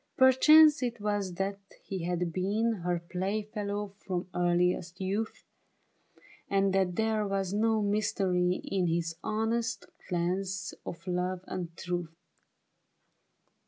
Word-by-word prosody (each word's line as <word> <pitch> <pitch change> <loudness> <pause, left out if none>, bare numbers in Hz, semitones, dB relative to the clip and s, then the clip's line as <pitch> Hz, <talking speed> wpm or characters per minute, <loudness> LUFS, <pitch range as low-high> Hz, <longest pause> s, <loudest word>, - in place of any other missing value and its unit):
Perchance 300 +4 +7
it 240 -2 -2
was 205 -3 -1
that 195 +2 -2 0.2
he 190 -4 -4
had 175 -1 -1
been 210 +3 0
Her 175 -1 -1
play 195 +4 -1
fellow 205 -1 -4
from 180 -2 -3
earliest 175 0 +1
youth. 200 +4 -2 1.1
And 195 -1 +2
that 190 -2 +1
there 220 0 +1
was 195 -1 -1
no 220 +1 +2
mystery 190 -3 +1
in 185 -3 0
His 165 0 -1
honest 225 +3 -1 0.2
glance 185 +1 -1
of 170 -1 -7
love 180 0 -1
and 175 -3 -5
truth. 175 -2 -4
195 Hz, 120 wpm, -30 LUFS, 180-215 Hz, 1.1 s, Perchance